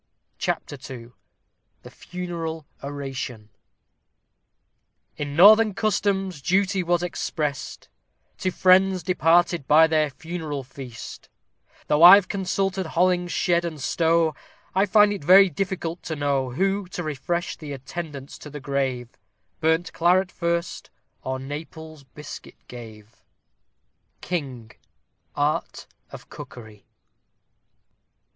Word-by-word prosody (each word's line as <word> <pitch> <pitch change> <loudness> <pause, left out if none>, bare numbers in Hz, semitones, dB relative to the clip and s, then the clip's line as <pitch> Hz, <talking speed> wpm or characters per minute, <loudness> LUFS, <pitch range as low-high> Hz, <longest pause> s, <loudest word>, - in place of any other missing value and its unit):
CHAPTER 145 - -3
II 120 -2 -9 0.7
THE - - -12
FUNERAL 165 -3 -6 0.2
ORATION 135 -6 -6 1.7
In 145 -1 -5
northern 210 +4 +7
customs 195 -5 -1
duty 190 +4 +1
was 175 0 0
exprest 150 -5 -4 0.5
To 185 - 0
friends 185 0 +3
departed 170 -3 +2
by 155 +2 +7
their 155 -2 +1
funeral 155 -1 -6
feast; 130 -2 -10 0.6
Though 150 +1 +1
I've 185 +2 +9
consulted 195 -1 -2
Hollingshed 175 0 +1
and 165 -3 -5
Stow, 165 +4 +1 0.4
I 195 +2 +2
find 210 -1 +5
it 200 - -7
very 190 +3 +7
difficult 180 -1 -3
to 160 - -3
know, 140 -3 0
Who, 195 +8 -1
to 175 0 -6
refresh 155 +4 -3
the 150 -3 -8
attendants 140 +1 -7
to 150 - -10
the 150 0 -8
grave, 130 -3 -2 0.5
Burnt 160 +2 +1
claret 180 +2 +2
first, 170 0 -3 0.3
or 130 0 -3
Naples' 155 +2 -8
biscuit 150 +3 -11
gave. 110 -3 -12 1.0
KING: 135 -10 -5 0.6
Art 145 +1 -1 0.3
of - - -11
Cookery. 110 -4 -12
160 Hz, 105 wpm, -24 LUFS, 140-180 Hz, 1.7 s, I've